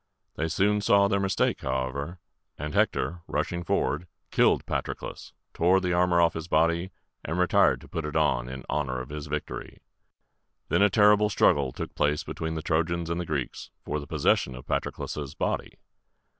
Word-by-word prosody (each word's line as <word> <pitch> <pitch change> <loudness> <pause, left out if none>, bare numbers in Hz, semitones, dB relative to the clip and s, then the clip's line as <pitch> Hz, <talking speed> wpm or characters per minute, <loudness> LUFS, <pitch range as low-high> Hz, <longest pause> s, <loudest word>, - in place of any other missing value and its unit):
They 80 - -2
soon 105 +6 +2
saw 100 -1 +5
their 100 0 +1
mistake, 95 -1 0
however; 65 +5 -3 0.4
and 75 0 -5
Hector, 85 0 +1
rushing 85 0 -2
forward, 80 +1 0 0.2
killed - - +3
Patroclus, - - -4 0.2
tore 90 +3 +4
the 90 -1 -1
armor 90 0 +3
off 85 -1 +4
his 80 0 -5
body, 85 +3 +2 0.3
and 80 +4 -3
retired 90 -1 +4
to - - -13
put 80 - -4
it 75 - -5
on - - +1
in 65 0 -7
honor 65 -4 -1
of 65 +2 -7
his 75 0 -6
victory. 75 +1 -5 0.9
Then - - +3
a 105 - +6
terrible 105 0 +5
struggle 70 -9 +3
took - - -6
place 75 0 +1
between 80 0 -4
the 80 - -4
Trojans 85 +1 0
and 85 +1 -1
the - - -4
Greeks 70 -5 -3 0.2
for 75 - -2
the 70 - -9
possession 65 - +1
of 65 - -10
Patroclus' 75 -1 -3
body. - - -2
80 Hz, 170 wpm, -27 LUFS, 75-90 Hz, 0.9 s, a